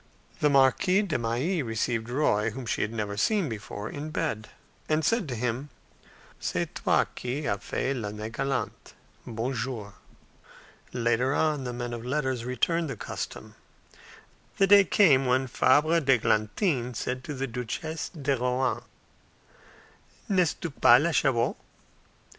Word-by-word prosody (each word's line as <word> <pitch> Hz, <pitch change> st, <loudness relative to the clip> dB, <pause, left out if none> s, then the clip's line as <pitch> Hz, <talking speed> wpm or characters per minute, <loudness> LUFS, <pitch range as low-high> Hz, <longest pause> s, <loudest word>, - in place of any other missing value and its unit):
The 150 Hz, -, +3 dB
Marquise 145 Hz, +9 st, +4 dB
de 155 Hz, -, 0 dB
Mailly 125 Hz, +10 st, 0 dB
received 115 Hz, -1 st, -2 dB
Roy, 115 Hz, -5 st, +1 dB
whom 125 Hz, +3 st, -7 dB
she -, -, -1 dB
had 105 Hz, -, -1 dB
never 105 Hz, -3 st, -3 dB
seen 200 Hz, -, +1 dB
before, 105 Hz, -2 st, -6 dB
in 145 Hz, +5 st, -6 dB
bed, 145 Hz, -9 st, -3 dB, 0.4 s
and 155 Hz, 0 st, +2 dB
said 225 Hz, -, +1 dB
to 125 Hz, -, -3 dB
him, 125 Hz, +4 st, -2 dB, 0.7 s
"C'est -, -, -2 dB
toi -, -, +2 dB
qui 135 Hz, +5 st, -3 dB
as 100 Hz, -1 st, 0 dB
fait 135 Hz, +1 st, -1 dB
l'Année 105 Hz, -1 st, -5 dB
galante! 135 Hz, +2 st, -3 dB, 0.3 s
Bonjour." 115 Hz, -2 st, -3 dB, 1.0 s
Later 120 Hz, +3 st, +1 dB
on, 150 Hz, -4 st, +1 dB
the 125 Hz, -, -3 dB
men 120 Hz, 0 st, -4 dB
of 115 Hz, -1 st, -6 dB
letters 130 Hz, -2 st, -1 dB
returned 160 Hz, +6 st, 0 dB
the 130 Hz, -, -5 dB
custom. -, -, -6 dB, 1.0 s
The 195 Hz, -, +5 dB
day 200 Hz, 0 st, +7 dB
came 140 Hz, -10 st, +4 dB
when 130 Hz, +1 st, +2 dB
Fabre 150 Hz, +6 st, +3 dB
d'Eglantine 125 Hz, -, +1 dB
said 125 Hz, +3 st, -3 dB
to 150 Hz, -, -5 dB
the 135 Hz, +1 st, -2 dB
Duchesse 125 Hz, +6 st, -4 dB
de 140 Hz, -5 st, -1 dB
Rohan, 125 Hz, +1 st, 0 dB, 1.5 s
"N'est 180 Hz, -5 st, +1 dB
tu 170 Hz, -, -4 dB
pas 120 Hz, -3 st, +6 dB
la 170 Hz, +4 st, +1 dB
Chabot?" 130 Hz, -6 st, +2 dB
130 Hz, 140 wpm, -27 LUFS, 115-150 Hz, 1.5 s, day